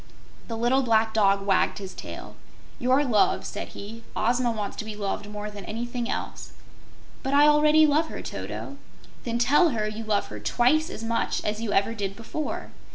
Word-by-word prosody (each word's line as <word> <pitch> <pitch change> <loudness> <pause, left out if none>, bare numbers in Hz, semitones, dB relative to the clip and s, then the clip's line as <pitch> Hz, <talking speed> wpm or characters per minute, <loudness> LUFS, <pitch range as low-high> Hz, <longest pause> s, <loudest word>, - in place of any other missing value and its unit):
The 230 - -4
little 245 +4 +3
black 220 -3 +2
dog 195 -2 +3
wagged 195 -1 +2
his 190 -2 -7
tail. - - -8 0.4
"Your 260 +4 +3
love," 215 -6 +2
said - - -5
he. 225 +3 -8
"Ozma 240 +3 +2
wants 210 -3 -4
to - - -3
be 215 -1 -6
loved 205 0 -3
more 210 0 -5
than 205 -1 -9
anything 240 +2 -4
else." - - -5 0.7
"But 270 +1 0
I 290 +1 +7
already 300 +1 +6
love 305 +2 +3
her, - - -7
Toto!" 280 - -6 0.5
"Then 235 -1 -1
tell 290 +8 +4
her 220 -6 -1
you 215 +1 -5
love 215 -2 +1
her - - -7
twice 310 +7 +2
as 225 - -7
much 230 0 -1
as 210 +1 -1
you 225 -3 -2
ever 200 +3 +2
did 200 -3 -4
before." 255 +7 -5
230 Hz, 185 wpm, -26 LUFS, 210-265 Hz, 0.7 s, I